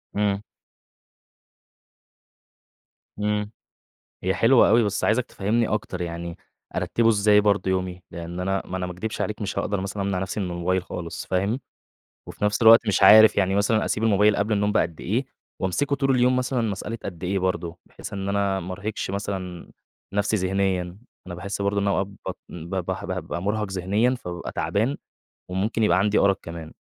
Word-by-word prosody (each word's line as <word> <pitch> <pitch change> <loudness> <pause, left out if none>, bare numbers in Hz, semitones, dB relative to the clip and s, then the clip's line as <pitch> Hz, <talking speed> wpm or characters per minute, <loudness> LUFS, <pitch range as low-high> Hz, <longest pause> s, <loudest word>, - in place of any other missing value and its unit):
إمم. 100 -1 +1 2.8
إمم. 105 0 -1 0.7
هي 95 +1 +1
حلوة 120 +5 +5
أوي، 115 +3 +5
بس 105 -1 -1
عايزك 115 +3 +2
تفهِّمِني 110 +3 0
أكتر، 95 -3 -3
يعني 85 0 -5 0.4
أرتبه 115 -1 +2
إزاي 105 -1 +5
برضه 100 -2 +2
يومي؟ 90 -1 -2
لأن 85 +1 -6
أنا 95 +1 0
ما 95 - -4
أنا 90 - -2
ما 90 - -5
أكدبش 105 +5 -4
عليك 105 +1 -3
مش 105 - -3
هاقدر 100 -2 -1
مثلًا 100 +1 -3
أمنع 95 -2 -1
نفْسِي 95 +3 -3
من 95 -3 -2
الموبايل 90 +1 0
خالص، 85 -2 -6
فاهم، 100 +7 0 0.7
وفي - - -3
نفْس 105 +2 0
الوقت 115 0 +7
مش 105 - +2
عارف، 110 0 +9
يعني 95 -1 +2
مثلًا 105 +2 +2
أسيب 110 - -1
الموبايل 105 -1 +4
قبل 105 +2 0
النوم 105 0 +1
بقد 85 -5 0
إيه؟ 115 +9 -1 0.3
وأمسكه 140 +10 0
طول 135 -1 +1
اليوم 125 0 +3
مثلًا 125 0 0
مسألة 110 +1 -3
قد 90 -2 -7
إيه 95 +2 0
برضه؟ 90 -2 -2
بحيث - - -10
إن 100 0 -3
أنا 100 -1 +1
ما 90 0 -5
أرهقش 100 +2 -4
مثلًا 95 -3 -5 0.4
نفْسِي 105 +2 +1
ذهنيًا، 95 -2 -1 0.3
أنا 90 - -6
باحس 100 +3 -5
برضه 100 0 +1
إن 100 - 0
أنا - - +3
أوقات 95 - 0 0.2
بط - - -4
ب 85 +2 -7
به 95 0 -3
بابقى 85 -2 -4
مرهق 105 +1 -1
ذهنيًا، 100 +7 +1
فبابقى 90 -8 -6
تعبان 115 +8 0 0.5
وممكن 100 +5 -1
يبقى 90 -4 +4
عندي 105 +2 +2
أرق 100 -2 +3
كمان، 85 -1 -8
100 Hz, 175 wpm, -24 LUFS, 90-105 Hz, 2.8 s, عارف